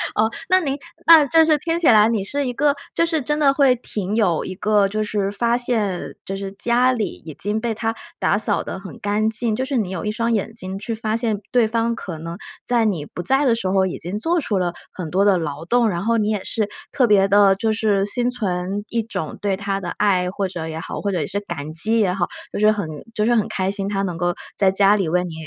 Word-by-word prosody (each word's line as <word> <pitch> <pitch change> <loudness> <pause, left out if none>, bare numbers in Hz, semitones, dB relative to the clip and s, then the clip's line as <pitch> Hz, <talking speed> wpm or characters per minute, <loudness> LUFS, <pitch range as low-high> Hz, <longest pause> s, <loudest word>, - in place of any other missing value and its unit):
哦， 220 +1 +3 0.2
那 370 +1 +5
您 280 -6 -2 0.3
那 325 -3 +9
这 325 +3 +5
是 310 -1 +4
听 330 +3 -2
起 340 - +2
来 215 -2 +6
你 220 -4 0
是 280 +8 -2
一 250 - -1
个， 285 +3 +2 0.2
就 335 - +2
是， 325 -2 0
真 295 +3 -1
的 280 -2 +4
会 275 -2 +4
挺 210 -4 -4
有 185 -8 +2
一 185 - -5
个， 210 0 +2
就 215 +2 -2
是 205 -2 -1
发 235 +3 +1
现， 220 -7 -1
就 195 - -4
是 195 0 -5
家 240 +5 +2
里 230 -5 0
已 160 -2 -10
经 210 +8 -2
被 230 0 -2
她 225 +1 -2 0.2
打 205 - +2
扫 215 - 0
得 - - -5
很 195 0 -10
干 210 +2 0
净， 225 0 0
就 260 - -1
是 265 0 -1
你 210 -6 -1
有 190 - -4
1 210 - -1
双 230 +2 -1
眼 220 0 -1
睛 190 -3 -5
去 215 +3 -4
发 220 -1 -2
现 225 -3 0
对 245 -2 +5
方 230 +1 0
可 180 -7 -7
能 165 +2 -7 0.3
在 240 -2 +3
你 185 -9 -1
不 175 - -7
在 270 +9 +2
的 240 -3 +4
时 210 -5 -2
候， 190 0 +3
已 185 - -3
经 185 +5 -4
做 335 +7 +1
出 210 -7 -1
了 175 -2 0 0.2
很 175 -4 -6
多 190 +5 +2
的 200 -2 +4
劳 150 -2 -4
动， 240 +4 +3
然 175 -2 -2
后 230 +2 +2
你 210 -1 +1
也 210 -3 -1
是 215 -3 -1 0.2
特 255 -3 +2
别 200 -2 +4
地， 200 -1 +5
就 220 +3 0
是 210 -2 +1
心 245 +4 0
存 200 -4 -2
一 235 - 0
种 210 -8 -5
对 200 -2 0
她 195 0 -2
的 180 -3 -5
爱， 185 -3 +1
或 195 +1 -2
者 170 -3 -5
也 160 0 -5
好， - - -6
或 200 - -1
者 165 -5 -1
是 200 - -2
感 165 -7 -6
激 215 +9 +1
也 195 -4 +2
好。 180 -2 -1 0.2
就 - - -4
是 215 +1 +5
很 205 -6 -2 0.3
就 210 - +1
是 240 - +3
很 220 - +1
开 190 0 -1
心， 200 -1 -4
她 195 -1 -1
能 180 -4 -3
够 175 +1 0 0.2
在 195 - +4
家 195 +2 +4
里 195 -4 0
为 180 +2 +1
你 175 -2 -6
210 Hz, 275 characters per minute, -21 LUFS, 190-235 Hz, 0.3 s, 那